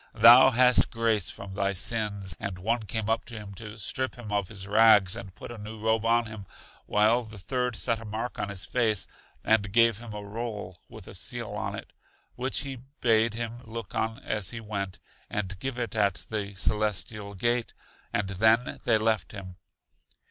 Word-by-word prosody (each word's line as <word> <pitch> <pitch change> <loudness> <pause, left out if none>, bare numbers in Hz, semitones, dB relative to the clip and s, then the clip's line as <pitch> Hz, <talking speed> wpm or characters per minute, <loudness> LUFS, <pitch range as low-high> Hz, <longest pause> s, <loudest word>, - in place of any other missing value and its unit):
thou 120 +3 +9
hast 125 0 +5
grace 115 -4 0
from 100 -1 -8
thy 100 0 0
sins. 100 -2 0
And 100 -2 -4
one 110 +4 -1
came 110 0 -2
up 115 +1 +1
to 120 - -8
him 105 -2 -8
to 105 +2 -9
strip 130 +5 -1
him 120 -4 -9
of 100 -2 0
his 95 -2 -6
rags 105 -3 +6
and 95 -2 -9
put - - -9
a 120 - -8
new 110 +1 -8
robe 110 +1 +1
on 115 +1 +3
him, 110 -4 -9 0.4
while 110 +4 +3
the 110 -1 -11
third 125 +5 -2
set 115 +1 0
a 115 - -10
mark 110 +3 -4
on 100 - -2
his 95 -2 -5
face, 110 -4 +1 0.4
and 105 -2 +2
gave 115 0 +4
him 115 -1 -9
a 105 0 -6
roll 105 -4 -6
with - - -11
a - - -9
seal - - -4
on - - -3
it, - - -9 0.4
which 130 +2 -1
he 135 -2 -5 0.2
bade 115 -1 +3
him 115 0 -4
look 115 -3 -7
on 110 0 -1
as 105 -4 -1
he 120 - -5
went, 100 -4 -4 0.3
and 100 -2 -3
give 135 +1 -3
it 120 -2 -3
at 100 -5 +1
The 100 -2 -3
Celestial 105 0 0
Gate; 120 +4 0 0.4
and 100 - 0
then 110 +5 +2
they 110 - +4
left 110 -3 0
him. 95 -3 -9
110 Hz, 190 wpm, -28 LUFS, 100-115 Hz, 0.4 s, thou